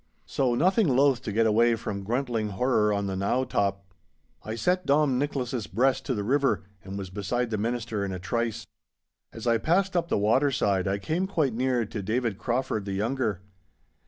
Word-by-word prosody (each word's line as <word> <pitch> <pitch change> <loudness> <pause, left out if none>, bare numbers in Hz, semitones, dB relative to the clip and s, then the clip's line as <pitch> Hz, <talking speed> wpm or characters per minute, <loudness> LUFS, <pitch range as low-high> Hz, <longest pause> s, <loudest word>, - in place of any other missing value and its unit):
So, 125 -3 0
nothing 190 - +3
loath 135 -1 +3
to 105 - -4
get 115 +2 +2
away 115 +2 +4
from 100 -3 -5
gruntling 115 -2 -1
horror 110 -1 +2
on 100 -1 0
the 95 -1 -2
knowe 110 +7 0
top, 100 -4 -1 0.6
I 110 - -5
set 180 +10 0
Dom 140 -3 +3
Nicholas's 130 - -2
breast 130 +8 +1
to 130 - 0
the 105 - -2
river, 135 -2 +1 0.2
and 95 +1 -7
was 95 -2 -6
beside 115 +5 -2
the 110 - -1
Minister 115 -2 -2
in 100 - -3
a 95 - -3
trice. 115 +5 -2 0.7
As 115 - -9
I 115 -1 +3
passed 185 - +1
up 170 -1 +1
the - - 0
waterside 105 -3 +2
I 100 +1 0
came 160 - -1
quite 155 - 0
near 125 0 +1
to 105 0 -5
David 110 0 -1
Crauford 120 -3 -1
the 100 - -3
younger. 110 -1 -1
115 Hz, 190 wpm, -27 LUFS, 100-135 Hz, 0.7 s, away